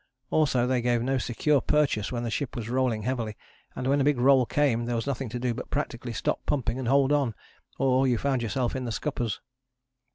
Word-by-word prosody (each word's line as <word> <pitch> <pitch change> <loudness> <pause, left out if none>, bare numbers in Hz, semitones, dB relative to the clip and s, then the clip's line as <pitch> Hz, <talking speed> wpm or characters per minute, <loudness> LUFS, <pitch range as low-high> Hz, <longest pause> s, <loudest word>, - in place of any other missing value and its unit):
Also 135 -6 +3
they 125 -1 +1
gave 120 -1 +1
no 135 +1 +1
secure 135 +4 +1
purchase 145 -9 +1
when 120 -1 -2
the 115 - -2
ship 140 +1 -3
was 115 -1 -4
rolling 125 -4 +1
heavily, 115 -3 -2 0.4
and 125 - -4
when 140 +2 +2
a - - +3
big 145 -1 +3
roll 130 -1 +5
came 130 -6 +1
there 120 0 -1
was 115 - -2
nothing 135 -3 -3
to 120 - -4
do 120 0 -1
but 120 - -7
practically 125 -4 -3
stop 105 - -2
pumping 125 -3 0
and 130 - -3
hold 135 +2 +4
on, 140 -7 +1 0.4
or 135 0 +3
you 125 -2 +2
found 135 0 0
yourself 120 +2 -1
in 130 -1 -3
the 120 - -3
scuppers. 120 -3 -3
125 Hz, 220 wpm, -27 LUFS, 120-135 Hz, 0.4 s, roll